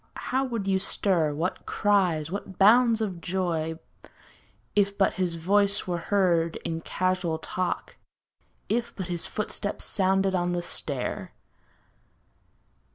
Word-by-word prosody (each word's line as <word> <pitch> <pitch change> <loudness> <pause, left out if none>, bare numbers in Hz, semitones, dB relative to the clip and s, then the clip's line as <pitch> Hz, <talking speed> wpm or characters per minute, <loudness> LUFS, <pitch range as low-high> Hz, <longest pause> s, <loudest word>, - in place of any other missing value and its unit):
How 260 +1 +2
would 230 -7 -3
you 190 -1 +2
stir, 180 -5 +1
what 170 +5 -3
cries, 180 -7 +1
what 195 -1 -6
bounds 225 +2 +5
of 190 -6 -3
joy. 165 -3 -1 1.0
If 200 -1 +2
but 195 - +3
his 180 -3 -1
voice 200 +4 +2
were 175 -2 -2
heard 170 -3 +2
in 165 -1 -2
casual 185 -2 -1
talk. 180 +2 -3 0.7
If 235 +2 -1
but 190 -2 -5
his 175 -1 -1
footstep 205 -1 -3
sounded 190 0 +1
on 175 -1 0
the 175 0 -2
stair! 140 -6 -3
185 Hz, 125 wpm, -27 LUFS, 170-200 Hz, 1.0 s, bounds